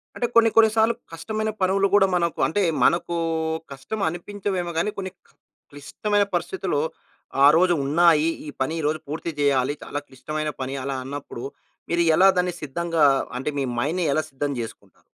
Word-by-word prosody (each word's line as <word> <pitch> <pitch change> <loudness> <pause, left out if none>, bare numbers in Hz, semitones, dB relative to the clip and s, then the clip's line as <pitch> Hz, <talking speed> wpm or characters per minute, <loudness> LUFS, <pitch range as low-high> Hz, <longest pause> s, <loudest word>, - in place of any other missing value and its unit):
అంటే 240 - -1
కొన్ని 225 -1 +6
కొన్ని 225 -1 +7
సార్లు, 225 +1 +4 0.2
కష్టమైన 215 +5 -3
పనులు 195 +1 +3
కూడా 195 -1 +5
మనకు 170 -2 0
అంటే 205 +6 0 0.2
మనకు, 170 0 +2 0.6
కష్టం 195 +10 -6
అనిపించవేమో 185 0 -4
గాని 210 +6 +1
కొన్ని, 190 -1 -4 0.6
క్లిష్టమైన 205 +9 -1
పరిస్థితుల్లో 175 -3 -1 0.6
"ఆరోజు 175 +4 +5
ఉన్నాయి. 160 +1 +4 0.2
ఈ - - -4
పని 135 +5 0
ఈరోజు 155 +1 0
పూర్తి 160 +3 -4
చేయాలి. 140 -1 +2
చాలా 145 - -4
క్లిష్టమైన 155 +3 -4
పని". 135 +1 -3
అలా 135 0 -3
అన్నప్పుడు, 135 -3 -7 0.5
మీరు 170 0 +2
ఎలా 195 +1 +7
దాన్ని 180 -1 +1
సిద్ధంగా, 165 +2 -1 0.4
అంటే 145 - -2
మీ 135 - 0
మైండ్‌ని 165 +7 0
ఎలా 155 - +1
సిద్ధం 140 +1 -2
చేసుకుంటారు? 100 -4 -10
170 Hz, 150 wpm, -24 LUFS, 145-190 Hz, 0.6 s, కొన్ని